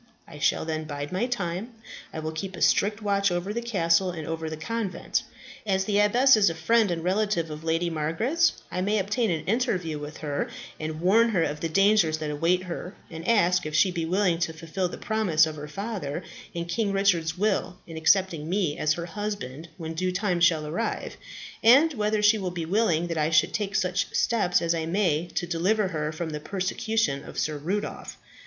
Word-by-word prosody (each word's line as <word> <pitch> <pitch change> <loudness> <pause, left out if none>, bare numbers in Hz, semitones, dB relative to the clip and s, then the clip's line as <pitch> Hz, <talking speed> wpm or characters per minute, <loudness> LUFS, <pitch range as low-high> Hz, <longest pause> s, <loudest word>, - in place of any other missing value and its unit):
I 150 - -11
shall 140 - +1
then 155 -1 -3
bide 145 -1 -5
my 190 +7 0
time. 205 -1 -3 0.4
I - - -8
will 155 0 -3
keep 190 +4 -5
a 170 - -9
strict 210 +2 +2
watch 200 -2 +2
over 175 +4 -2
the 235 - -2
castle 185 -5 +2
and 160 -3 -5
over 160 0 -3
the 155 - -5
convent. 195 +1 -2 0.4
As 190 -2 0
the 205 0 +1
abbess 245 +6 +5
is 210 -4 +4
a 165 - -4
friend 220 +6 +3
and 165 -2 -2
relative 185 -3 0
of 150 +1 -7
Lady 165 +1 0
Margaret's, 170 - +1 0.2
I 180 - -2
may 205 +3 +1
obtain 215 +4 0
an 160 -3 -2
interview 185 - 0
with 150 +1 -7
her, 145 -2 -3 0.3
and 155 0 -4
warn 220 +6 +4
her 185 -7 +2
of 150 -1 -2
the 165 - -2
dangers 195 -3 +4
that 155 -1 -3
await 170 +5 +1
her, 180 +1 -6 0.2
and 165 0 -7
ask 180 -7 +3
if 155 - -4
she 185 +3 +4
be 170 -2 -2
willing 180 0 +1
to 165 -2 -1
fulfil 165 +3 -3
the - - -7
promise 215 -9 +2
of 155 -1 -5
her 150 0 -7
father, 185 -3 -4 0.3
and 170 0 -3
King 205 +3 0
Richard's 180 -4 +1
will, 200 -2 0
in 165 - -10
accepting 165 -1 +2
me 180 -5 0
as 155 0 +2
her 170 +1 -5
husband 175 -7 -5
when 160 -1 -5
due 185 +3 -1
time 180 -1 0
shall 165 -3 +3
arrive, 170 +10 -3 0.5
and 280 +8 +6
whether 210 -2 0
she 215 +1 +5
will 190 -2 -2
be 175 -2 -4
willing 175 -3 +2
that 165 -2 -3
I 155 0 +2
should 160 -1 +3
take 200 -2 -2
such 180 0 0
steps 205 -8 +2
as 170 0 +2
I 160 -1 -2
may 175 -3 +1
to - - 0
deliver 185 +5 +1
her 155 -3 -2
from 160 +1 -4
the 150 - -4
persecution 190 -3 -1
of - - -10
Sir 150 -1 -1
Rudolph. 195 +8 -4
175 Hz, 205 wpm, -26 LUFS, 160-205 Hz, 0.5 s, and